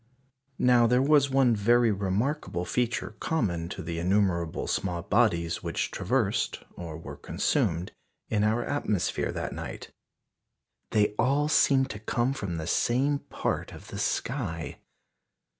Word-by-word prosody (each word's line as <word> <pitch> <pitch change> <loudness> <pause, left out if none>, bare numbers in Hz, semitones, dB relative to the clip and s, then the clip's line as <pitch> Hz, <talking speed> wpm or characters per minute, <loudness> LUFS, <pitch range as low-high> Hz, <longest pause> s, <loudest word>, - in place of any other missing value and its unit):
Now 125 -2 +5
there 125 +2 +3
was 140 -1 +4
one 130 -3 +4
very 120 +2 +4
remarkable 100 - -1
feature 120 0 -1
common 85 - -1
to - - -6
the 85 0 -4
innumerable 90 -3 +1
small 90 -3 -2
bodies 85 -7 +1
which - - -2
traversed, - - 0
or 85 -3 -7
were 85 - -8
consumed 85 +3 0 0.4
in 105 -2 +1
our 110 +3 +2
atmosphere 110 -10 -1
that - - -4
night. - - -7 1.0
_They 105 -1 +2
all 140 +5 +2
seemed 135 -3 +3
to 105 - -7
come 120 +4 0
from 100 -10 -4
the 80 - -4
same 135 - +1
part - - -3
of - - -12
the - - -6
sky. 95 - -2
110 Hz, 135 wpm, -28 LUFS, 90-125 Hz, 1.0 s, Now